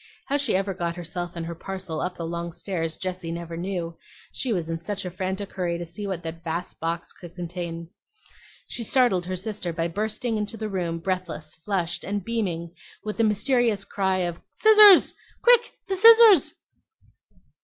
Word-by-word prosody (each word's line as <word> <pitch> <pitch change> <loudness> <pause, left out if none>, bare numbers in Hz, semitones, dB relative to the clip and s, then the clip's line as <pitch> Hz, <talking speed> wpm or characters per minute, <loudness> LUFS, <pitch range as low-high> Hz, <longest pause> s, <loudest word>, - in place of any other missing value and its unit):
How 285 - 0
she 280 -8 +1
ever 195 +1 0
got 170 -2 -3
herself 175 0 -5
and 165 -1 -4
her 170 - -5
parcel 185 -2 -5
up 180 0 -3
the 170 - -4
long 170 0 -4
stairs 170 -2 -3
Jessie 185 -2 -4
never 170 0 -6
knew, 170 -1 -4 0.3
she 255 - -1
was 175 -6 -1
in 165 0 -3
such 195 +3 -4
a 180 - -4
frantic 190 +2 -4
hurry 175 -3 -1
to 175 - -5
see 185 +5 -6
what 185 -3 -4
that 165 0 -7
vast 170 +2 -4
box 165 +1 -3
could 175 -1 -13
contain. 170 -1 -5 0.8
She 235 - -3
startled 220 -8 +2
her 185 - -2
sister 195 -2 -3
by 165 0 -2
bursting 215 +4 -2
into 210 +2 -4
the 215 0 -4
room 175 -4 -2
breathless, 165 -3 -4
flushed, 175 0 -2
and 200 -1 -3
beaming, 180 -8 -2 0.3
with 210 0 -4
the 230 - +2
mysterious 220 -1 +2
cry 190 -2 0
of, 175 -1 -4
"Scissors! 425 -3 +7 0.3
quick, 480 -1 +5
the 390 - -1
scissors!" 445 - +8
185 Hz, 175 wpm, -25 LUFS, 170-210 Hz, 0.8 s, scissors